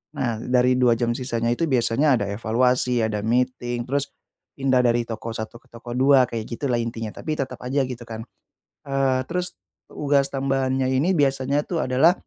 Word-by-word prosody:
Nah, 120 -5 -1
dari 125 +1 +2
2 120 -2 +4
jam 120 0 0
sisanya 120 -2 -1
itu 165 +7 0
biasanya 130 +2 +3
ada 100 -3 -2
evaluasi, 120 +2 +1
ada 110 -1 -1
meeting, 120 +2 -1
terus 140 +3 -1 0.5
pindah 135 -2 +2
dari 120 -1 +3
toko 115 0 -6
1 110 +1 -6
ke 130 - -29
toko 120 0 -10
2, 130 +1 +5
kayak 115 -1 -4
gitu 125 +2 -3
lah 120 - +1
intinya. 115 -2 -4
Tapi 155 - -4
tetap 130 -3 -4
aja, 135 +2 0
gitu 125 -2 -6
kan. 110 0 -6 0.6
Eee, 135 -2 +1
terus 180 +2 -3 0.3
tugas 140 -1 +1
tambahannya 135 -1 0
ini 165 +8 +2
biasanya 140 0 +1
tuh 170 -3 -2
adalah 130 +7 +4
125 Hz, 175 wpm, -23 LUFS, 120-135 Hz, 0.6 s, 2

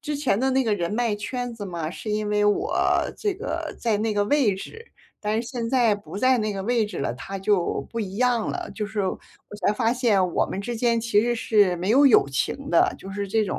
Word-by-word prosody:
之 295 +1 -3
前 270 -8 +1
的 265 +2 +1
那 265 0 +2
个 215 -2 +2
人 175 -2 -2
脉 230 -1 0
圈 245 +3 -4
子 210 -3 -7
嘛， 170 -3 -4
是 215 - -6
因 210 0 -1
为 210 0 +2
我 375 - +1 0.4
这 415 -3 -1
个 440 +6 -4
在 220 -3 0
那 215 -1 -1
个 205 0 +2
位 250 -5 +2
置， 450 - -9 0.3
但 215 +2 0
是 235 - -8
现 235 -3 -4
在 240 -5 +3
不 205 -1 -9
在 255 +3 +3
那 215 -1 -1
个 195 -1 -4
位 230 0 +1
置 210 - -7
了， 135 - -1
它 195 +9 -7
就 195 -2 0
不 230 - -3
一 195 -2 -5
样 245 -2 +1
了。 - - -5
就 210 - -3
是 215 0 -3
我 185 - -2 0.5
才 205 - +4
发 230 +1 +1
现 205 -8 +2
我 - - +2
们 190 - -5
之 240 +4 -4
间 230 0 +1
其 225 -2 +2
实 240 +1 0
是 205 -5 +2
没 185 +4 -2
有 280 +4 +6
友 235 - +6
情 275 - -2
的， 365 +1 +3
就 195 - -9
是 200 0 -4
这 220 +1 +2
种 185 - -3
220 Hz, 265 characters per minute, -24 LUFS, 205-245 Hz, 0.5 s, 有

